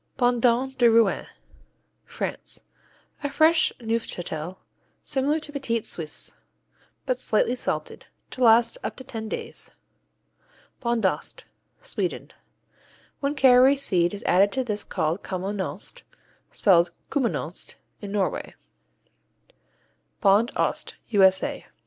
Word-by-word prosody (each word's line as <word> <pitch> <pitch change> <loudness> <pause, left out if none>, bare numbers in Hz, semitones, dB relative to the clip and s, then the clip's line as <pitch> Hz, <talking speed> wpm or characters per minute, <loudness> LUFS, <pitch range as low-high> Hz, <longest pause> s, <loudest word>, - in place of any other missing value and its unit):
Bondon 245 +1 +2
de 240 -1 +6
Rouen 225 -3 +3 0.8
France - - -5 0.6
A 285 - 0
fresh 315 +3 +4
Neufchâtel, 185 -7 -3 0.5
similar 285 +3 0
to 300 - -4
Petit 235 -6 -1
Suisse, 160 -3 -4 0.7
but 255 -1 0
slightly 230 0 +1
salted, 250 - -4 0.2
to 255 - -2
last 230 0 +5
up - - -4
to 260 - -9
ten 220 -3 -6
days. - - -6 1.1
Bondost 235 -5 -1 0.4
Sweden - - -3 0.9
When 280 +1 -1
caraway 265 0 +6
seed 185 -9 +1
is 200 - -9
added 195 +3 +4
this 210 -3 -2
is - - -2
called 160 +5 -1
Kommenost, 190 +1 -4 0.5
spelled 175 -4 +4 0.2
Kuminost 265 -5 -2 0.3
in 200 -2 -6
Norway. 200 -3 -2 1.6
Bond 205 +4 +4
Ost - - -1 0.2
_U.S.A. 190 -3 +3
230 Hz, 105 wpm, -25 LUFS, 195-260 Hz, 1.6 s, de